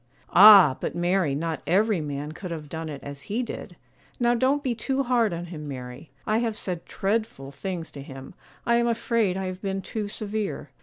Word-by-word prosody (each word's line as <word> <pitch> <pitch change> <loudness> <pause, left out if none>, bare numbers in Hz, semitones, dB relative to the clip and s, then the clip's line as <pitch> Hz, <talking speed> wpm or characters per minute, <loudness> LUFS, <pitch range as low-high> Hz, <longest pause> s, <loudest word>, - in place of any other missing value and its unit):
'Ah! 195 -8 +9
but - - -3
Mary, 175 -4 +1
not 160 +2 -3
every 200 0 +2
man 145 0 -4
could 180 +3 -7
have 155 -3 -6
done 160 0 -5
it 145 -2 -7
as 140 0 -8
he 230 +5 0
did; 235 - -7 0.4
now 240 0 +3
don't 265 +4 +1
be 255 -4 0
too 265 +4 -1
hard 240 -4 +2
on 170 0 -4
him, 155 -4 -8
Mary; 130 +2 -8 0.2
I 215 +1 +2
have 225 -2 -1
said 180 -3 -4
dreadful 195 -10 -2
things 175 +1 -5
to 140 - -9
him; 135 -1 -10 0.3
I 235 0 +3
am 235 0 +2
afraid 230 -4 +1
I 190 - -3
have 185 0 -5
been 195 -1 -3
too 215 +1 -4
severe. 205 -8 -4
190 Hz, 200 wpm, -25 LUFS, 155-220 Hz, 0.4 s, Ah